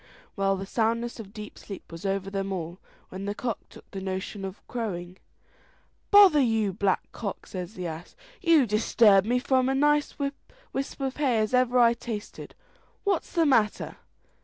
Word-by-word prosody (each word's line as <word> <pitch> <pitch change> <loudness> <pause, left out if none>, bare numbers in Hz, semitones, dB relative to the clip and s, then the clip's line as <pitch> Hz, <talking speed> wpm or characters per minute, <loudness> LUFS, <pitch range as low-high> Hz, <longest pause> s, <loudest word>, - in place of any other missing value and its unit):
Well, 195 -1 +1
the 195 - -5
soundness 230 +3 -1
of 205 -3 -9
deep 210 -1 -9
sleep 195 -3 -10
was 165 +4 -5
over 195 0 -2
them 195 0 -2
all, 175 -1 -4 0.3
when 190 +1 -6
the 205 0 -3
cock 235 -2 -3
took - - -15
a 190 - -3
notion 190 +1 -4
of 190 0 -7
crowing. 185 -7 -4 0.9
"Bother 395 -7 +8
you, 225 -5 +1
Black 195 0 0
Cock!" 200 -4 -5
says 185 +2 -6
the 180 - -5
ass: 165 +1 -7 0.3
"you 330 -6 +5
disturbed 210 -2 +4
me 245 +2 +2
from 260 0 +2
as 270 - +1
nice 295 +1 +2
a 280 -1 0 0.4
wisp 275 +1 -4
of 270 -1 -2
hay 270 -6 +2
as 215 +2 0
ever 250 0 +3
I 235 -1 +6
tasted. 230 -3 -7 0.5
What's 390 -5 0
the 335 -2 +3
matter?" 230 -7 +1
220 Hz, 175 wpm, -27 LUFS, 195-255 Hz, 0.9 s, Bother